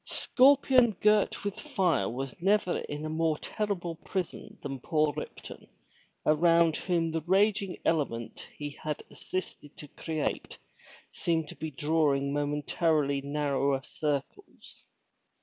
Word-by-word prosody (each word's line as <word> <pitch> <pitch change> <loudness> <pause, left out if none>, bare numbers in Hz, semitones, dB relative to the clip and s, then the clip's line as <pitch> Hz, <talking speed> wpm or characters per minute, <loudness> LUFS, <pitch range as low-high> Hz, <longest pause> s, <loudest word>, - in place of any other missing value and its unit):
Scorpion 260 -3 +4
girt 210 -1 +3
with 205 -1 -3
fire 170 - +1
was 135 +7 -6
never 195 -1 +2
in 150 +1 -5
a - - -3
more 160 -1 +1
terrible 185 -6 -3
prison 185 -1 -5
than 135 -1 -4
poor 155 +2 +1
Ripton, 150 - -8 0.6
around 165 +1 +4
whom 170 -3 0
the 160 0 -1
raging 195 +3 +2
element 135 -8 -1
he 145 0 -5
had 150 -1 -3
assisted 185 -5 -6
to 150 - -9
create 155 0 -3 0.5
seemed 165 -2 -1
to - - -9
be 160 - -5
drawing 145 -1 +1
momentarily 145 0 0
narrower 140 -1 0
circles. 150 - -5
160 Hz, 120 wpm, -29 LUFS, 145-185 Hz, 0.6 s, Scorpion